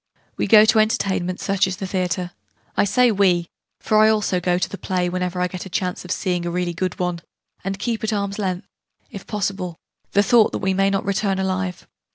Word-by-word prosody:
We - - -1
go 215 -1 +8
to 220 0 +4
entertainments, 190 -4 0
such 195 -1 +2
as 185 -1 -4
the 195 - -4
theatre 180 -1 -2 0.4
I - - +3
say 245 +4 +4
'we', 180 -4 +2 0.3
for 215 - +2
I 215 0 +6
also 210 -4 +1
go 175 0 +1
to 185 +1 0
the 200 - -8
play, 180 -1 -1
whenever 180 0 -2
I 180 - +2
get 185 +1 -6
a - - -11
chance 180 0 -2
of 180 - -11
seeing 180 -3 -1
a 175 - -2
really 175 0 -1
good 185 +2 -3
one 180 -2 -2 0.4
and 195 +1 -3
keep 225 +2 -3
at 220 - 0
arm's 200 -1 -2
length, 185 -3 -2 0.5
if 200 -4 -9
possible, 195 -4 -3 0.4
the 200 - +4
thought 230 0 +4
that - - 0
we 190 0 0
may 195 +1 +2
not 195 0 -1
return 200 0 0
alive. 185 -1 -2
190 Hz, 215 wpm, -22 LUFS, 180-200 Hz, 0.5 s, go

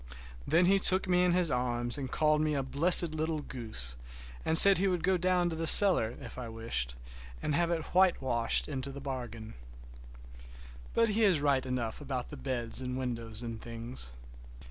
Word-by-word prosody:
Then 170 +2 +1
he 195 +2 +1
took 190 0 +4
me 180 0 0
in 180 - 0
his 175 -3 0
arms 120 -1 -3
and 135 -2 -7
called 150 +1 -1
me 155 -1 -2
a 135 - -3
blessed 165 +5 +4
little 155 0 -4
goose, 110 - -5 0.5
and 160 0 +4
said 195 0 +10
he 195 - -1
would 180 -3 -3
go 190 0 0
down 180 -1 -2 0.2
cellar 155 - +7
if 125 -2 -12
I 120 -2 -8
wished, 110 - -5 0.5
and 150 - -3
have 170 +3 -1
it 165 -2 -4
whitewashed 130 -11 -1
into 140 -2 -7
the 140 - -11
bargain. 120 -5 -9 1.4
But 230 -1 +1
he 215 +2 -1
is 185 -7 +2
right 140 -2 -1
enough 125 -1 -6
about 130 -3 -7
the - - -10
beds 120 -2 -6
and 125 0 -6
windows 115 -3 -6
and 115 -2 -9
things. 115 - -9
135 Hz, 175 wpm, -28 LUFS, 120-175 Hz, 1.4 s, said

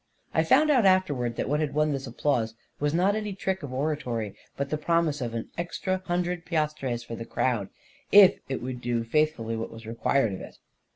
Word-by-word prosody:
I 160 - +3
found 300 - +5
out 255 -5 +4
afterwards 145 -12 +2
that - - -1
what 150 +3 +1
had 150 -2 -2
won 150 0 +2
this 135 -1 -3
ap 115 - -11
plause 115 -6 +1 0.2
was 145 0 +1
not 185 +6 +2
any 210 -2 -3
trick 190 0 -2
of 145 -4 -6
oratory, 130 -6 -2 0.2
but 140 0 -3
the 155 - +1
promise 165 -2 +1
of 115 -2 -3
an 115 - -4
extra 185 +2 -2
hundred 175 0 -1
piastres 150 -8 -1
for 115 - -6
the 115 - -6
crowd, 115 -3 -1 0.4
if 200 -1 +8
it 135 -3 -3
would 125 -1 -5
do 120 -1 0
faithfully 115 -3 0
what 115 0 -4
was 115 0 -11
required 115 0 +1
of 95 - -6
it. - - -11
145 Hz, 210 wpm, -27 LUFS, 120-175 Hz, 0.4 s, if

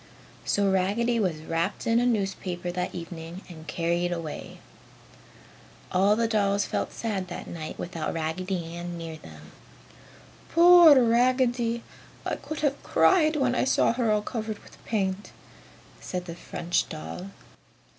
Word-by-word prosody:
So 200 -1 +2
Raggedy 215 +6 +1
was 170 -7 -1
wrapped 165 +4 -2
in 230 +1 +3
a 245 - +2
newspaper 190 -5 -2
that 180 0 -3
evening 170 +1 -7
and 160 -3 -11
carried 170 +2 0
away. 165 -3 -5 1.3
All 195 +3 +4
the 230 +1 +1
dolls 205 -2 +1
felt - - -2
sad 200 -5 -3
that 175 - -7
night 155 -2 -7
without 170 -2 -4
Raggedy 170 +2 -3
Ann 175 0 -5
near 165 -1 -6
them. - - -13 1.0
"Poor 340 -4 +8
Raggedy! 240 -1 +2 0.4
I - - -1
could 310 -1 -6
have 285 -2 0
cried 320 -4 +4
when 265 -4 +2
I - - +1
saw 260 - +3
her 235 -2 0
all 210 0 +1
covered 220 -2 -4
with - - -18
paint!" 195 -2 -2 0.7
said 180 -1 -5
the 170 - -6
French 170 0 -2
doll. 180 +3 -7
195 Hz, 140 wpm, -27 LUFS, 175-235 Hz, 1.3 s, Poor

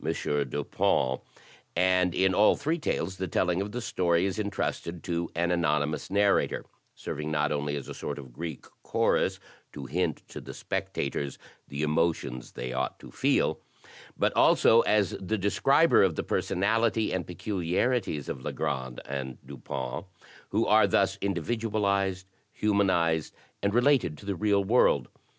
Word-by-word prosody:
Dupinj 70 -2 0 0.5
and 90 0 +3
in 95 0 +3
all 105 +3 +5
three 160 +4 -1
tales 95 - -2
the 95 - -2
telling 90 +2 +1
of 100 +1 -4
the 125 - -4
story 85 -4 +1
is 100 +2 -2
entrusted 90 -4 -3
to 85 0 -2
an 85 +1 +1
anonymous 75 -3 0
narrator, 100 0 +2 0.3
serving 75 +1 -5
not 75 -1 0
only 75 0 -1
as 70 - -5
a - - -6
sort - - -5
of 65 -4 -10
Greek 80 +1 -6 0.2
chorus - - +1 0.3
to 70 -2 -7
hint 80 +3 -1
to - - -8
the - - -9
spectators 70 -2 -3 0.3
the 70 +2 -4
emotions 75 -5 -1
they 65 +1 -5
ought 65 +1 -2
to - - -13
feel, - - +1 0.6
but - - +2
also 115 +1 +6
as 105 -3 +2
the 105 +4 -1
describer 135 - +4
of 95 -5 +3
the - - -2
personality 110 +4 +1
and 95 -2 -2
peculiarities 95 - -1
of 65 - -5
Legrand 65 -1 -3
and 65 -2 -5
Dupin, 65 +1 -5 0.4
who - - +1
are - - +5
thus - - +2
individualized, 100 -1 0 0.3
humanized, 95 -6 +1 0.3
and 100 - +1
related 120 - +3
to - - -13
the 100 - -1
real 100 +1 +2
world. 115 +6 +3
90 Hz, 145 wpm, -28 LUFS, 75-100 Hz, 0.6 s, also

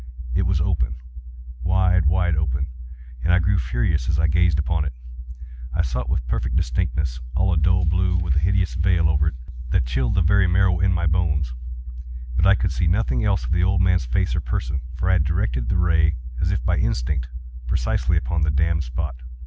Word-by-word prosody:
It 95 -2 +1
was 90 -3 +1
open—wide, 65 +4 -1
wide 90 0 +2
open—and 65 -2 -4
I 90 - +5
grew 95 +2 +2
furious 65 +2 -1
as 80 - +1
I 80 - +2
gazed 85 0 +2
upon 80 +1 0
it. 75 - -4 0.8
I 85 - +2
saw 65 -3 -2
it 60 - -4
with 75 -5 -1
perfect - - -2
distinctness—all 70 +5 -1
a - - 0
dull 90 +3 +2
blue, 90 +2 +1
with 85 -4 -1
a - - +3
hideous 95 +2 +1
veil 85 -1 +2
over 80 -1 +1
it 80 - -1 0.3
that 65 - +1
chilled 60 0 -1
the 90 - +3
very 100 +2 +3
marrow 90 0 +2
in 95 +1 +2
my 85 -1 0
bones; 80 -6 0 0.8
but 85 +7 +3
I 100 - +6
could 95 - -1
see 70 +6 0
nothing 85 - +1
else - - +1
of - - -5
the 85 +1 +2
old 95 0 +2
man's 90 -6 +2
face - - 0
or - - -1
person: 70 +2 -3
for 85 - -2
I 95 - +3
had 85 -4 +3
directed 65 -7 -1
the - - +1
ray 80 -2 +2 0.3
as - - +1
if - - -2
by - - +1
instinct, 65 0 -1 0.4
precisely 65 +6 0
upon 85 0 -1
the 75 - +2
damned 80 +2 +1
spot. 65 +1 -4
80 Hz, 195 wpm, -22 LUFS, 65-90 Hz, 0.8 s, I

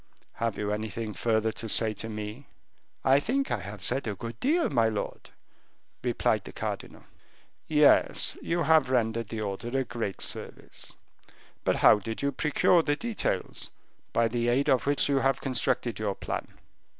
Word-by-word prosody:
"Have 115 -2 -1
you 105 0 -2
anything 110 +1 -3
further 110 +3 +1
to 115 +1 -6
say 110 0 +3
to 110 +1 -6
me?" 105 +5 -6 0.6
"I 135 +1 +6
think 270 - -1
I 115 - 0
have 100 +1 -8
said 120 +4 0
a 105 - -2
good 115 +3 -7
deal, 330 +6 +2
my 115 -5 +2
lord," 105 -2 -5 0.7
replied - - +1
the - - -9
cardinal. - - -5 0.6
"Yes, 150 -2 +4
you 170 0 0
have 155 -5 +4
rendered 115 -3 +1
the 110 -1 -4
order 100 +2 -4
a 135 - +2
great 115 -7 -4
service. - - -5 0.7
But - - +2
how 105 - +8
did 115 +6 -5
you 140 - +2
procure 150 +4 +3
the 145 -2 0
details, 230 +6 -2 0.4
by 115 0 +3
the 120 +1 -1
aid 135 +5 +2
of 130 0 +2
which 145 -1 +4
you 140 -1 +2
have 135 -1 +2
constructed 125 -3 0
your 105 -2 -1
plan?" - - -4
115 Hz, 165 wpm, -28 LUFS, 110-140 Hz, 0.7 s, how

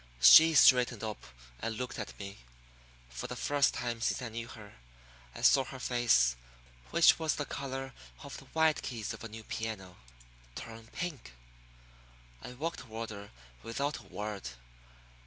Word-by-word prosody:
She 160 - +9
straightened 125 -5 +6
up 110 -1 -5 0.4
and 115 -1 -3
looked 125 0 -5
at 105 - -6
me. 100 0 -8 0.7
For 60 - -6
the - - -6
first 145 -1 +2
time 120 -1 -3
since - - 0
I 125 -3 -5
knew 115 +1 -6
her 105 -3 -12 0.6
I - - -8
saw 135 - +6
her 135 - -8
face 120 - +3 0.5
which - - +5
was 160 -1 0
the 145 - -3
color 135 -1 -5 0.3
of - - -8
the - - -13
white 160 -1 +2
keys 115 -4 -4
of - - -10
a 115 - -6
new 110 +1 -9
piano 105 -5 -5 0.6
turn 115 0 -9
pink. 145 - -6 1.1
I 125 - -8
walked 160 +7 -4
toward 115 -2 -6
her 100 -1 -9 0.3
without 130 +4 -3
a - - -15
word. 100 - -5
115 Hz, 155 wpm, -31 LUFS, 105-135 Hz, 1.1 s, She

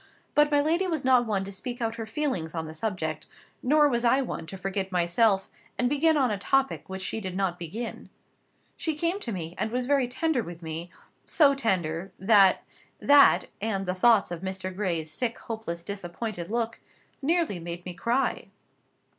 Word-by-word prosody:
But 295 0 +5
my 290 -1 +3
lady 335 +6 +1
was 315 -6 -2
not 250 -2 +4
one 200 -3 0
to 195 - -7
speak 240 +5 -6
out 225 -1 -1
her 225 -1 -6
feelings 220 - -2
on 160 -1 -2
the 155 - -8
subject; 160 -4 -3 0.3
nor 295 +3 +4
was 240 -3 0
I 245 +3 +4
one 165 -9 -5
to 195 - -7
forget 195 0 -3
myself, 190 +3 +2 0.3
and 245 - +2
begin 300 +4 +3
on 260 -5 +2
a 205 - -2
topic 270 +2 0
which 190 0 -5
she 220 - -3
did 185 -2 -4
not 185 -3 -1
begin. 210 +8 -6 0.7
She 320 -2 -2
came 335 +5 -1
to 240 - -4
me, 170 -4 -5
and - - 0
was 250 +2 -1
very 275 -1 +2
tender 260 +2 0
with 175 -4 -9
me; 165 +2 -5 0.3
so 290 -5 +4
tender, 185 - -1
that 195 -1 +5 0.4
that, 285 -1 +6 0.2
and 200 -3 -1
the 180 - -1
thoughts 210 +1 +4
of 175 -1 -5
Mr. 190 -1 -5
Gray's 170 -6 -2
sick, 235 +8 -2
hopeless, 220 -7 -5
disappointed 195 0 -5
look, 230 0 -2 0.4
nearly 320 - +1
made 170 +1 -7
me 180 - -5
cry. 235 +8 0
215 Hz, 185 wpm, -27 LUFS, 180-260 Hz, 0.7 s, that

